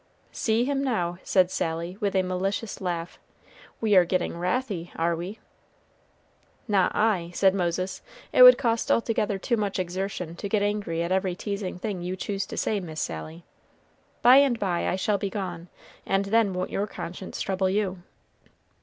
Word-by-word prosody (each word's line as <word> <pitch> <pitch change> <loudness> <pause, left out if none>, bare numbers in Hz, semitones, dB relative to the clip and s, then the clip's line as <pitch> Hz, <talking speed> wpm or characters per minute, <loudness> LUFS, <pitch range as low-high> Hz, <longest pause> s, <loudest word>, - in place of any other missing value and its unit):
"See 225 +2 +1
him 275 0 0
now," 175 -9 -1
said 185 -1 +2
Sally, 165 +2 -2
with 200 -3 -1
a 190 - +3
malicious 195 +4 -3
laugh; 175 -2 -4 0.6
"we 215 -3 +2
are 185 - +8
getting 180 0 -1
wrathy, 180 -1 -2
are 170 +1 +1
we?" 180 +6 -6 1.3
"Not 195 -4 +2
I," 210 -6 +1
said 190 -1 +4
Moses; 185 0 -2 0.3
"it - - +5
would - - +11
cost 230 -3 0
altogether 215 -3 +1
too 235 +5 0
much 205 -2 -1
exertion 185 -2 -3
to 200 - -5
get 205 0 +1
angry 205 -5 -1
at 170 - -3
every 190 -1 +1
teasing 200 -2 -4
thing 190 -1 -4
you 180 +1 -3
choose 195 0 -3
to - - -7
say, 210 - 0
Miss 160 -4 -7
Sally. 80 - -5 0.8
By 250 +3 +8
and 275 -4 +4
by 185 -5 -1
I - - 0
shall 200 +2 0
be 200 - -2
gone, 180 -4 -5 0.4
and 195 +1 0
then 220 0 +3
won't 180 0 -3
your 205 +2 -1
conscience 185 -1 -7
trouble 190 -1 0
you?" 190 -2 -1
190 Hz, 170 wpm, -26 LUFS, 175-210 Hz, 1.3 s, would